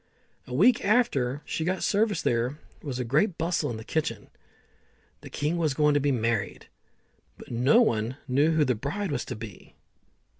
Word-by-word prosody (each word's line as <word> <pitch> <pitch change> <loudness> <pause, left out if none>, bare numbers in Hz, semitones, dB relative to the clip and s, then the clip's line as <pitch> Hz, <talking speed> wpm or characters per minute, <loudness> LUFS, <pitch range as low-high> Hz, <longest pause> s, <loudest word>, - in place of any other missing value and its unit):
A 125 - -7
week 215 - +4
after 150 - +1
she 160 - -3
got 185 +2 -1
service 210 0 +1
there 120 +4 0 0.2
was 135 -4 -5
great 150 - +1
bustle 165 -2 -1
in 115 - -4
the 110 - -8
kitchen. 160 +6 -3 0.9
The - - -10
king 150 +4 -2
was 155 -5 0
going 150 0 +3
to 145 - +3
be 145 0 +1
married, 115 -4 -1 0.7
but - - -12
no 125 - +4
one 115 - 0
knew 140 +4 +3
who 160 -2 +3
the 125 - +2
bride 145 - -3
was 130 -4 -2
to 125 - -5
be. 105 -4 -11
145 Hz, 175 wpm, -27 LUFS, 125-170 Hz, 0.9 s, week